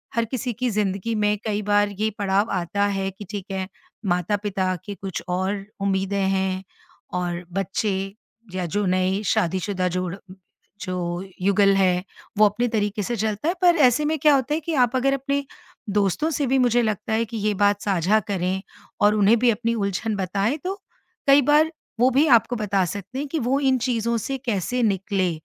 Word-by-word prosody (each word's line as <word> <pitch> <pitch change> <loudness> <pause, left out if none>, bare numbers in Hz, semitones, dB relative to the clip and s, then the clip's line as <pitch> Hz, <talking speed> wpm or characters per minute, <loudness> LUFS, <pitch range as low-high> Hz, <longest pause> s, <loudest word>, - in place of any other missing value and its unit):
हर 230 0 +2
किसी 250 +1 -3
की 250 +3 -1
ज़िंदगी 205 +1 -1
में 210 0 +1
कई 210 -1 -1
बार 205 0 +3
ये 220 - +2
पड़ाव 200 +2 +1
आता 180 +3 -1
है 195 -1 -1
कि 205 +2 -10
ठीक 200 -3 -5
है, 190 -1 -3 0.4
माता-पिता 190 +1 0
के 205 - -6
कुछ 195 -2 -5
और 190 +2 -1 0.2
उम्मीदें 195 0 0
हैं 190 -1 0 0.6
और 175 0 -3
बच्चे 195 +2 -1 0.6
या 185 - -1
जो 205 +4 -1
नए 185 +2 +1
शादीशुदा 185 +1 0
जोड़ 180 0 -2 0.7
जो 180 -1 -3 0.2
युगल 195 +1 +4
है, 180 -2 +2 0.3
वो 215 - +7
अपने 215 +4 +1
तरीके 210 -2 -1
से 240 +5 -2
चलता 215 +5 -1
है - - +1
पर 350 -1 +6
ऐसे 295 +5 +1
में 315 +1 +1
क्या 300 -1 +5
होता 270 +2 0
है 310 - +1
कि 330 +1 -3
आप 245 - -7
अगर 270 +2 +2
अपने 275 +1 -1 0.5
दोस्तों 205 - +1
से 285 -2 0
भी 265 +2 +2
मुझे 245 -1 +3
लगता 215 0 -2
है 225 +1 +1
कि 225 0 -6
ये 210 0 0
बात 205 +1 +2
साझा 195 +1 +2
करें, 190 0 -1 0.4
और 205 +1 +5
उन्हें 215 +3 +5
भी 245 +1 +4
अपनी 230 +1 -1
उलझन 210 +1 -1
बताएँ 195 - 0
तो 380 +1 -1 0.5
कई 280 +1 +7
बार 300 +3 +4 0.3
वो 250 - +5
भी 285 +5 +4
आपको 245 -1 +4
बता 200 -3 +1
सकते 200 +7 -6
हैं 290 - -3
कि 320 - -1
वो 260 +2 +1
इन 265 -1 +3
चीज़ों 235 -1 0
से 270 +5 -3
कैसे 240 +2 0
निकले। 195 -3 0
205 Hz, 185 wpm, -23 LUFS, 190-240 Hz, 0.7 s, वो